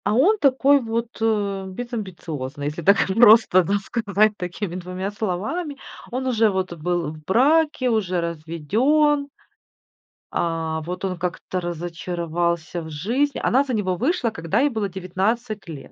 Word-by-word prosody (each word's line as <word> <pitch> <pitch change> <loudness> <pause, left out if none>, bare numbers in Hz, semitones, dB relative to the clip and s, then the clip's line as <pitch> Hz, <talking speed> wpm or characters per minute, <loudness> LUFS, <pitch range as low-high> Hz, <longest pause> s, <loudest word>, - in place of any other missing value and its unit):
А 205 - +1
он 400 - +4
такой 275 0 +4
вот, 230 0 -2
э, 205 -3 0
безамбициозный, 180 - -6
если 150 +3 -3
так 200 +5 +4
просто, 215 -2 +6
да, 200 +4 +1
сказать 210 0 +1
такими 180 0 -5
2 185 +2 -4
словами. 220 - -3 0.3
Он 255 +2 -2
уже 225 -4 +3
вот 190 -2 -2
был 170 -1 -2
в 155 -1 -13
браке, 290 - +3
уже 190 -6 0
разведен. 210 - +1 1.1
А. 165 -1 -1
Вот 180 +2 -5
он 185 -1 -2
как-то 180 +1 -3
разочаровался 170 0 -3
в 160 - -8
жизни. 235 - -1
Она 265 +3 +3
за 265 -3 -4
него 190 -4 0
вышла, 260 - +1
когда 200 +1 -1
ей 290 - +3
было 220 -5 -2
19 195 +4 -2
лет. 155 -5 -9
195 Hz, 145 wpm, -23 LUFS, 175-235 Hz, 1.1 s, просто